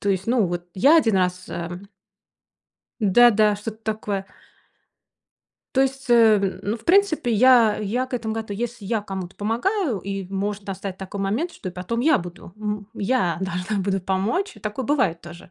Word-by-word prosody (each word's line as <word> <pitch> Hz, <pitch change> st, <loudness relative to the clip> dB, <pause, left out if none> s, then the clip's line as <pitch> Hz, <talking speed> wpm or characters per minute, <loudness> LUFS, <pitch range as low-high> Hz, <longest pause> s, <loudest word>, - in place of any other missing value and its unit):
То 200 Hz, -, -2 dB
есть, 190 Hz, -1 st, -1 dB
ну 235 Hz, -2 st, +3 dB
вот 175 Hz, 0 st, -4 dB
я 280 Hz, -, +5 dB
1 225 Hz, -11 st, +3 dB
раз, 180 Hz, 0 st, 0 dB
эм 175 Hz, +3 st, -6 dB, 1.1 s
Да-да, 215 Hz, 0 st, +5 dB
что-то 215 Hz, +1 st, -7 dB
такое. 205 Hz, -2 st, -4 dB, 1.5 s
То 265 Hz, -, +6 dB
есть, 270 Hz, 0 st, -2 dB
э, 215 Hz, -5 st, +4 dB
ну, 215 Hz, +3 st, -2 dB
в 225 Hz, -, -21 dB
принципе, 355 Hz, -8 st, +3 dB
я 235 Hz, -1 st, +5 dB
я 230 Hz, +5 st, -2 dB
к 255 Hz, -, -6 dB
этому 225 Hz, -2 st, -2 dB
готова. 220 Hz, -2 st, -4 dB
Если 235 Hz, -2 st, -5 dB
я 220 Hz, 0 st, -1 dB
кому-то 190 Hz, -3 st, -6 dB
помогаю, 245 Hz, -, 0 dB
и 195 Hz, +1 st, -5 dB
может 200 Hz, +1 st, -3 dB
достать 195 Hz, -1 st, -5 dB
такой 190 Hz, +1 st, -7 dB
момент, 225 Hz, -, -1 dB
что 185 Hz, -, -7 dB
потом 185 Hz, +6 st, -3 dB
я 300 Hz, +3 st, +4 dB
буду, 175 Hz, 0 st, -8 dB
м, 210 Hz, -1 st, -4 dB
я 195 Hz, -6 st, 0 dB
должна 190 Hz, +3 st, -2 dB
буду 195 Hz, -1 st, 0 dB
помочь. 200 Hz, -, -1 dB
И -, -, -15 dB
такое 215 Hz, +4 st, -4 dB
бывает 250 Hz, -, +1 dB
тоже. 170 Hz, 0 st, -12 dB
210 Hz, 170 wpm, -23 LUFS, 190-240 Hz, 1.5 s, То